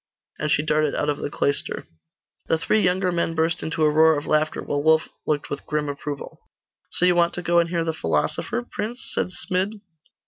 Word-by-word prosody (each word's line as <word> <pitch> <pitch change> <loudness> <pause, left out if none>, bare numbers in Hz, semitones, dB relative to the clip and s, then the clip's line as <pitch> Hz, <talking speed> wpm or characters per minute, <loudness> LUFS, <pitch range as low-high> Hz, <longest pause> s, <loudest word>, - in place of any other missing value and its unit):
And 150 - -1
she 145 - +2
darted 155 -1 +1
out 145 - 0
of 145 - 0
the - - -3
cloister. 140 -1 -1 0.6
The 160 - +2
three 215 +6 +2
younger 185 0 +2
men 170 -1 -1
burst 160 +2 +1
into 160 0 -1
a 150 - +5
roar 160 0 +5
of 145 - -4
laughter, 155 0 +1
while 145 - -1
Wulf 160 +1 +3 0.2
looked 150 -1 -1
with 145 - -4
grim 150 -1 -1
approval. 145 0 -6 0.5
'So 180 - +2
you 180 - +5
want 170 0 +3
to 180 - -5
go 170 0 +3
and 170 0 +1
hear 170 -1 0
the 165 0 -1
philosopher, 80 - -1
prince?' 235 +4 -5
said - - 0
Smid. 190 +3 -2
160 Hz, 205 wpm, -24 LUFS, 150-175 Hz, 0.6 s, a